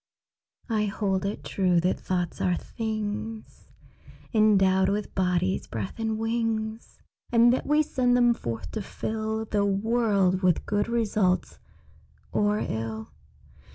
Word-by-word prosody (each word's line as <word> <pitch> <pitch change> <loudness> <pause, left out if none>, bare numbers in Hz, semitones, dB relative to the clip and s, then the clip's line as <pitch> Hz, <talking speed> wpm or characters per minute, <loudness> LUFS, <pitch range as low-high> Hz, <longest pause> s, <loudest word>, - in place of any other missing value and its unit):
I 215 -2 +1
hold 195 -1 -1
it 205 - -5
true 180 -3 +2
that 180 +2 0
thoughts 180 -2 -2
are 180 -1 +2
things 215 +1 -5 0.6
Endowed 195 -3 +4
with 205 +1 -2
bodies, 185 0 0
breath, 105 - -5
and 220 -1 -1
wings, 225 0 -2 0.3
And 240 0 +6
that 260 - -2
we 300 +1 +4
send 250 -3 +2
them 240 -1 +5
forth 115 - -5
to 220 - -3
fill 220 +2 -3
The 205 -1 0
world 200 -2 +2
with 180 -4 +2
good 205 +1 0
results 215 -5 0 0.7
or 210 0 +2
ill. 110 - -4
210 Hz, 125 wpm, -26 LUFS, 185-225 Hz, 0.7 s, And